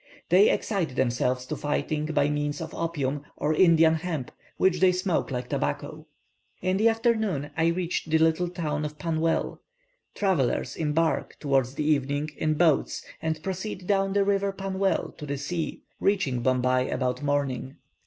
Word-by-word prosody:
They 190 +4 +6
excite 180 - -1
themselves 125 0 0
to 155 - -4
fighting 150 +1 -1
by 150 -2 +2
means 145 0 -1
of 160 0 -6
opium, 145 -4 -2
or 150 +1 +1
Indian 165 -1 +5
hemp, 160 -5 -3 0.3
which 185 -2 +3
they 185 +1 +5
smoke 180 -1 0
like 125 -2 -3
tobacco. 70 0 -3 0.5
In 185 +1 0
the 220 +3 +5
afternoon, 220 - 0
I 160 +1 +2
reached 170 -1 -1
the 160 - +4
little 160 +2 +2
town 155 -4 -2
of 150 0 -5
Pannwell. 165 +1 -1 0.6
Travellers 185 -11 0
embark, 160 +1 0
towards 135 -3 +1
the 150 - -2
evening, 145 0 0
in 155 -1 0
boats, 160 -2 +2 0.2
and 160 -1 -2
proceed 190 0 -4
down 195 0 +1
the 200 0 +3
river 200 0 +1
Pannwell 195 0 -1
to 150 - -6
the 140 0 -2
sea, 160 +4 -4 0.2
reaching 185 -12 +1
Bombay 130 0 +2
about 125 +1 -1
morning. 140 -2 -1
160 Hz, 155 wpm, -26 LUFS, 140-180 Hz, 0.6 s, They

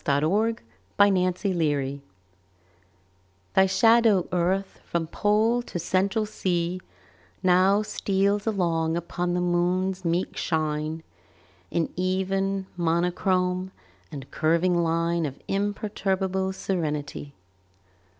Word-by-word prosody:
AT 140 0 +1
A - - +3
LUNAR 220 +6 +1 0.4
ECLIPSE 180 -8 +1 1.5
THY 190 - +5
shadow, 225 -2 +4
Earth, 185 +2 -1
from 170 -1 -2
Pole 215 +7 +1
to 240 - -6
Central 195 +5 0
Sea, 180 -4 -2 0.6
Now 185 +3 +4
steals 200 0 0
along 165 -5 0
upon 175 +1 -2
the 180 - 0
Moon's 180 +2 0
meek 170 +2 -1
shine 155 0 -2 0.7
In 170 -1 -1
even 190 +1 -1
monochrome 180 +2 0 0.4
and 135 -2 -8
curving 170 +2 +2
line 165 0 0
Of 135 0 -8
imperturbable 195 -1 -1
serenity. 150 -6 -3
180 Hz, 95 wpm, -25 LUFS, 170-195 Hz, 1.5 s, THY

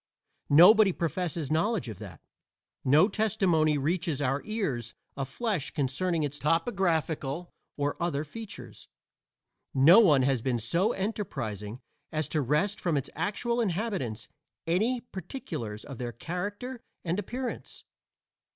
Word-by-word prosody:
Nobody 195 +7 +8
professes 165 -3 -2
knowledge 175 - +1
of 110 -5 -7
that. 95 -7 -10 0.6
No 150 +8 +5
testimony 185 -9 +2
reaches 160 +1 -1
our 140 0 0
ears 145 - -3 0.2
of 135 -1 -4
flesh 205 - -2
concerning 155 +4 0
its 145 0 -3
topographical 165 - 0 0.3
or 145 +2 -2
other 160 -4 0
features; 205 +6 -10 0.9
no 160 +10 +8
one 150 - +5
has 130 -2 +2
been 125 0 0
so 170 - +1
enterprising 125 - -4 0.3
as 155 -2 -1
to 155 - 0
wrest 150 - 0
from 170 -5 +1
its 135 - -3
actual 225 +8 -1
inhabitants 185 - -2 0.4
any 220 +9 +1
particulars 165 - -6
of 135 -4 -9
their 120 -1 -3
character 205 - -5 0.2
and 175 +3 0
appearance. 245 +5 -5
165 Hz, 125 wpm, -29 LUFS, 135-205 Hz, 0.9 s, Nobody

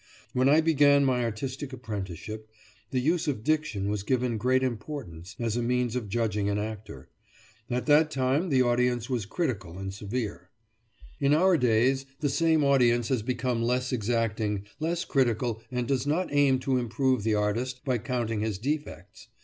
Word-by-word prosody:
When 130 +2 +3
I 155 +3 +6
began 145 -3 +4
my 125 -2 +1
artistic 130 +5 -4
apprenticeship, 110 -2 -6 0.4
the 130 - 0
use 160 +6 +1
of 130 -7 -2
diction 155 -10 0
was 105 0 -1
given 125 0 0
great 130 +3 +2
importance, 110 - -5
as 115 -2 -1
a 120 - 0
means 125 0 0
of 115 -5 -3
judging 105 -2 0
an 100 - 0
actor. 110 0 -6 0.6
At 125 0 -1
that 155 +1 +5
time 140 +5 0
the 130 -3 +4
audience 120 0 +1
was 115 -6 -1
critical 105 - -3
and 95 0 -5
severe. 100 -3 -5 0.7
In 140 +1 +3
our 185 +3 +4
days, 130 +1 +2
the 145 - 0
same 160 +1 +2
audience 120 -4 +3
has 130 -4 +1
become 120 0 -1
less 125 +2 0
exacting, 110 -3 -1
less 170 +3 -1
critical, 120 -4 0
and 125 -2 -2
does 135 -1 0
not 160 +2 0
aim 140 -2 +4
to 130 -1 +1
improve 125 +1 0
the 110 +1 +1
artist, 115 +5 -1
by 130 -3 +1
counting 115 -2 -2
his 110 -3 -2
defects. 115 - -5
125 Hz, 165 wpm, -27 LUFS, 110-135 Hz, 0.7 s, I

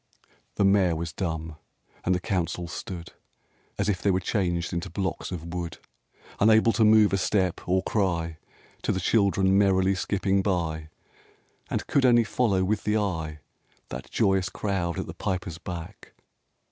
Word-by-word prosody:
XIII - - -36 0.2
The 100 - +2
Mayor 95 -3 +4
was 80 0 -4
dumb, 80 -3 -4 0.5
and 90 - +2
the - - 0
Council 90 -3 -2
stood 85 0 -7 0.6
As 100 - 0
if 100 -4 0
they 100 - +2
were 95 -1 +2
changed 85 -3 -1
into 85 +2 -3
blocks 95 +2 -3
of 85 -1 -6
wood, 85 -2 -4 0.6
Unable 110 +2 +5
to 115 - +3
move 105 -1 +6
a 95 - +2
step, 95 -2 +1
or 95 +1 +2
cry 85 -6 -1 0.4
To - - 0
the 95 - -1
children 95 -1 +3
merrily 95 -1 +3
skipping 95 +1 0
by, 80 -5 -1 0.8
And - - -2
could 140 - +2
only 120 -2 +6
follow 110 -4 +1
with 105 +2 0
the 105 +1 +1
eye 80 -7 -2 0.5
That - - -7
joyous 95 -1 +2
crowd 95 -6 -2
at - - -2
the - - -7
Piper's 90 -3 -3
back. 90 +1 -8
95 Hz, 160 wpm, -26 LUFS, 85-100 Hz, 0.8 s, move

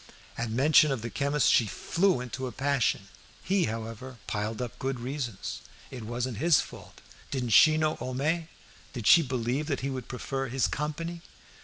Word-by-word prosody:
At 115 -1 -3
mention 145 +5 +5
of 125 -5 -2
the 115 - -4
chemist 140 +7 +2
she 115 - +4
flew 175 - +1
into 130 +1 -5
a - - -5
passion. 135 -6 0 0.4
He, 195 -1 +2
however, 115 +3 -6
piled 105 +1 -3
up 125 -2 -5
good 135 -1 -2
reasons; 125 -4 -4 0.3
it 130 - -7
wasn't 120 +1 -3
his 160 +3 +4
fault; - - -8 0.3
didn't 125 -3 -2
she 155 +8 +7
know 155 0 +2
Homais 150 +6 -1 0.5
did 120 -5 -5
she 170 - +8
believe 130 +1 -2
that 140 -4 -1
he 135 +1 -2
would 130 -2 -5
prefer 135 +1 -3
his 130 +1 +1
company? 165 +3 -4
130 Hz, 170 wpm, -28 LUFS, 120-150 Hz, 0.5 s, she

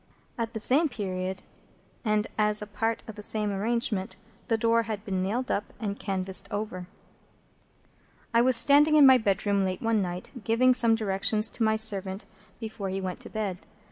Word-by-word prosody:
At 230 -1 -4
the - - -2
same 290 +8 +3
period, 190 -5 -5 0.6
and 215 -2 0
as 210 0 +3
a 210 - -3
part 225 +2 -3
of 220 - -7
the 210 - -10
same 210 0 +3
arrangement,—the 205 0 -3
door 230 +1 +2
had 220 -2 -6
been 190 -2 -2
nailed 235 +7 -2
up 205 - -1
and 205 -2 -4
canvased 190 -1 -1
over. 205 -4 -5 1.5
I 230 - +4
was 255 +1 +5
standing 290 +6 +5
in 295 -2 +7
my 260 -1 +7
bedroom 200 -1 0
late 185 -1 -2
one 225 -2 0
night, 180 -1 -5
giving 250 +4 +3
some 235 -2 +4
directions 215 +1 0
to - - -8
my 220 -1 +3
servant 200 -3 0 0.3
before 220 -4 -6
he 190 +1 -3
went 185 -2 -5
to - - -7
bed. 205 -5 -4
215 Hz, 175 wpm, -27 LUFS, 195-230 Hz, 1.5 s, in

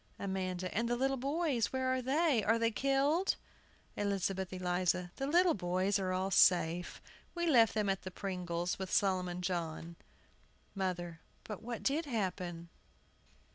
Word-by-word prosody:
AMANDA. 185 -2 -3
And 230 +3 0
the 240 - +1
little 270 +2 +1
boys 275 -2 0
where 260 0 0
are 260 - 0
they? 275 -2 +2
Are 225 +3 +3
they 230 0 +1
killed? 275 - +2 0.6
ELIZABETH 195 -2 -1
ELIZA. 180 -1 0
The 270 - -2
little 345 +3 +4
boys 185 +2 0
are 185 -1 -1
all 185 +1 -1
safe. 175 -2 +3 0.4
We 345 0 -1
left 235 -10 +5
them 210 -2 +1
at 195 -1 0
the 185 - -6
Pringles', 180 -2 -3
with 190 -1 -4
Solomon 180 -2 +1
John. 170 -2 -3 0.8
MOTHER. 175 -4 -3 0.2
But 210 -3 -7
what 235 0 -6
did 305 +4 +1
happen? 180 -7 -3
195 Hz, 145 wpm, -34 LUFS, 180-255 Hz, 0.8 s, left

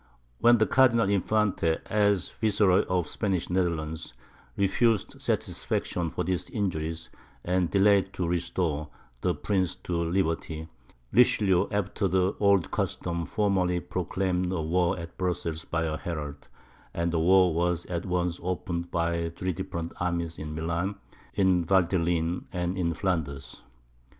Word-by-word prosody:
When 120 0 +6
the 110 - +3
Cardinal 115 -2 +4
Infante, 100 -4 +1
as 100 -3 +1
Viceroy 105 -4 +3
of 90 -1 +1
the - - -11
Spanish 95 -5 -1
Netherlands, 80 -7 -2 0.4
refused 105 +2 +1
satisfaction 85 -2 -1
for 90 - -3
these 90 0 -2
injuries, 80 -6 -3 0.3
and 90 -1 +1
delayed 100 -1 +4
to 90 - -2
restore 85 -3 -1 0.3
the - - +1
prince 95 -3 0
to 90 - -4
liberty, 80 -2 -1 0.5
Richelieu, 105 -6 +4
after 100 0 -1
the 95 +1 +1
old 100 -3 +3
custom, 85 -1 -2
formally 95 -4 +1
proclaimed 90 +1 -1
war 90 +1 +1
at 85 -1 -8
Brussels 85 -3 -2
by 80 0 -1
a 80 -1 -1
herald, 75 -5 -6 0.5
and 85 0 0
the 85 - +2
war 90 +1 +5
was 85 +1 0
at 85 -1 -3
once 90 -1 -1
opened 85 -1 -3
by 85 0 0
three 90 +2 -3
different 85 +2 -5
armies 85 -1 -2
in 75 0 -5
Milan, 85 +5 -2 0.4
in 95 -3 +3
the 85 - -6
Valteline, 85 -2 +1
and 90 +1 -2
in 85 -3 -1
Flanders. 80 -8 -3
90 Hz, 135 wpm, -27 LUFS, 85-95 Hz, 0.5 s, When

